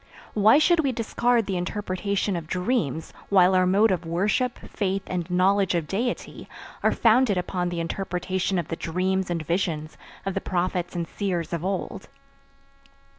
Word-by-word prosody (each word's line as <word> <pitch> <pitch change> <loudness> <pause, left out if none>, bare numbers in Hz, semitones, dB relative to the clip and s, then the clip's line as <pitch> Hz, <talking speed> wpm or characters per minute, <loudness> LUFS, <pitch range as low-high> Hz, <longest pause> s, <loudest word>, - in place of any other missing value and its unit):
Why 215 +5 +6
should 335 +2 +4
we 280 -4 +2
discard 235 0 +1
the 195 -2 -2
interpretation 200 +1 -2
of 165 -2 -5
dreams 180 - -1 0.2
while 190 -2 +5
our 185 0 +4
mode 205 +4 +4
of 180 -2 -1
worship, 200 +9 0
faith 195 -1 -1
and 180 -1 -3
knowledge 190 +1 +2
of 170 -2 0
Deity 235 +8 -3 0.3
are - - +3
founded 230 -3 +3
upon 180 0 -1
the 175 -1 -3
interpretation 185 +2 -2
of 170 -3 -2
the 165 - -2
dreams 185 +3 -1
and 165 -2 -2
visions 160 -3 -2 0.3
of 195 - -1
the - - -2
prophets 180 -1 -2
and 170 -1 -2
seers 175 -4 -3
of 170 -1 -2
old. 190 0 -3
185 Hz, 160 wpm, -25 LUFS, 175-205 Hz, 0.3 s, Why